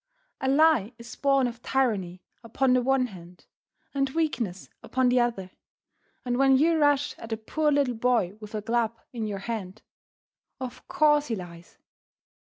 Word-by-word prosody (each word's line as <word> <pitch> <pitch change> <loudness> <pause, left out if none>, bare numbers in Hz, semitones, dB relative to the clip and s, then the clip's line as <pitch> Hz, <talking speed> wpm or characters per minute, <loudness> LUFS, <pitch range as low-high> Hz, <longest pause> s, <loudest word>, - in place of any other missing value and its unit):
A 265 - -1
lie 275 -6 +4
is 235 -1 -10
born 275 -2 +2
of 235 -1 -5
tyranny 205 -10 -1 0.2
upon 250 +3 +1
the 255 - +3
one 265 0 +2
hand 180 -5 -12 0.5
and 275 -1 0
weakness 260 - -2
upon 260 -1 +1
the 250 0 +3
other, 230 -6 -1 0.7
and 245 0 -1
when 270 -1 +5
you 320 +3 +3
rush 290 -1 +2
at 225 - -9
a 225 - -1
poor 300 +7 0
little 280 -3 +2
boy 225 -5 +1
with 210 0 -8
a 210 - -3
club 230 0 0
in 225 -3 -3
your 205 -2 -3
hand, 220 -4 -5 0.8
of 255 -2 -8
course 295 -1 +3
he 230 - -1
lies. 175 -3 -11
245 Hz, 165 wpm, -26 LUFS, 215-270 Hz, 0.8 s, when